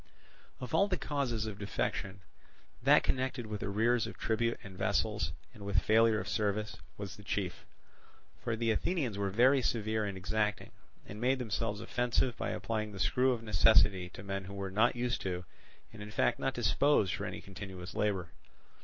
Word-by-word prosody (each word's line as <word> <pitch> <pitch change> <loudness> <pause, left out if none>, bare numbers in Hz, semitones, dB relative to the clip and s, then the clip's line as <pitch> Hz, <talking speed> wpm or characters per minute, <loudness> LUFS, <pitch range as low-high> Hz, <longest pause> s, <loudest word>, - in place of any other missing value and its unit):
Of 125 - -7
all 200 - +4
the 185 -3 0
causes 125 -7 -1
of 105 -2 -6
defection, 100 -1 -3 0.6
that - - +6
connected 130 -2 -1
with 105 -1 -5
arrears 110 +4 +2
of - - -9
tribute 115 +1 0
and 95 -2 -10
vessels, - - 0 0.2
and 105 - -11
with 100 0 +1
failure 110 0 +4
of - - -5
service, 105 0 -1 0.2
was - - -6
the - - -12
chief; - - -3 0.8
for 115 - 0
the 115 0 +1
Athenians 125 - -1
were 100 -1 0
very 130 +7 +5
severe 110 -2 0
and 100 -2 -4
exacting, 105 +2 -1 0.3
and 105 +2 -8
made 130 +2 +3
themselves 110 -3 -2
offensive 120 +1 0
by - - -3
applying 110 -2 -2
the 95 - -8
screw 130 +6 +3
of 115 -2 -2
necessity 100 -2 +4
to 100 - -10
men 95 -1 -4
who 100 +1 -8
were 95 -1 -4
not 110 +6 +3
used 120 -1 -1
to 90 -1 -3 0.5
and 110 - -10
in 105 - -7
fact 105 - +1
not 135 - -1
disposed 110 -2 +3
for 105 0 -3
any - - -5
continuous 95 -2 -8
labour. 95 -5 0
110 Hz, 180 wpm, -32 LUFS, 100-120 Hz, 0.8 s, that